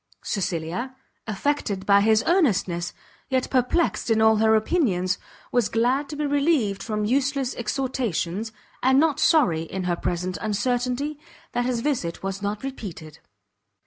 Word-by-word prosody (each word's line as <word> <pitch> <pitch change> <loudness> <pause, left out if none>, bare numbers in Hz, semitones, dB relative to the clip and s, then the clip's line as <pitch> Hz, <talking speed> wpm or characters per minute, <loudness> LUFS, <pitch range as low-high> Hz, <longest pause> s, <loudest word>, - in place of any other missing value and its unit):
Cecilia, 185 +6 -3 0.3
affected 210 -3 -1
by 200 0 +5
his 220 +1 +4
earnestness, 195 - +1 0.4
yet 260 -1 0
perplexed 260 +4 +1
in 225 -1 +3
all 220 0 +5
her 220 0 +4
opinions, 210 - +1 0.3
was 245 -4 +2
glad 250 +5 +1
to 300 - -5
be 300 0 -2
relieved 280 -8 +1
from 210 -1 -2
useless 270 +2 0
exhortations, 225 - -2 0.3
and 265 +1 +4
not 310 -2 +2
sorry, 200 - +4
in 185 +3 -5
her 180 -1 0
present 180 +1 -3
uncertainty, 250 +7 -1 0.3
that 245 0 0
his 245 -2 -1
visit 230 - -2
was 195 0 -3
not 205 +2 -3
repeated. 190 - -7
225 Hz, 140 wpm, -24 LUFS, 195-270 Hz, 0.4 s, by